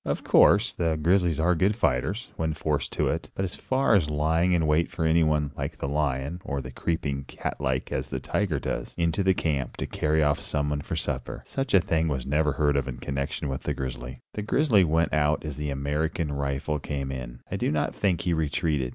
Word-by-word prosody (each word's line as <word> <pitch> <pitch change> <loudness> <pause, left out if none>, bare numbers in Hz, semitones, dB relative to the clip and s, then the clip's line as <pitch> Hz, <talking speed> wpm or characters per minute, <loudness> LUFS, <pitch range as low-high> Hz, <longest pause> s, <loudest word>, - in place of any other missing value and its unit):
Of - - -2
course, - - +5
the 85 -2 0
grizzlies 85 -1 +2
are 85 +3 +3
good 95 +5 +2
fighters, 80 - 0
when 80 -1 -1
forced 75 -2 -1
to - - +1
it; 80 -2 -2
but 95 - -1
as 90 - -5
for 130 -5 +3
lying 80 +3 +1
in 85 -2 +2
wait 75 +2 +2
for 80 - -2
anyone, 75 -3 +3
like 70 +3 -4
the 70 - -3
lion, 70 +3 -1
or 70 -1 -2
creeping, 70 +1 -3
cat - - -5
like, 65 0 -1
as - - -2
the 65 - -3
tiger 85 +4 -1
does, - - -4
into 85 +3 +1
camp 70 -7 -1
to - - -2
carry 75 0 +1
off 75 -1 +2
someone 75 -1 -1
for - - -4
supper, - - -3
such 135 -5 -1
a - - +8
thing 80 -1 +1
was 65 -5 -2
never 75 +1 +2
heard 75 0 +2
of 65 -1 0
in 65 - -5
connection 70 +1 -3
with 65 -1 -3
the - - -2
grizzly. 65 -1 -5 0.2
The 105 - -3
grizzly 110 -2 +3
went 80 0 +1
out 75 +1 +2
as 75 -2 -4
the 75 0 -3
American 75 +4 -1
rifle 70 +2 -1
came 70 -2 -4
in. - - -7
I - - -1
do - - 0
not 75 -1 0
think 95 -4 +1
he 90 - 0
retreated. 75 -4 0
75 Hz, 210 wpm, -27 LUFS, 70-85 Hz, 0.2 s, a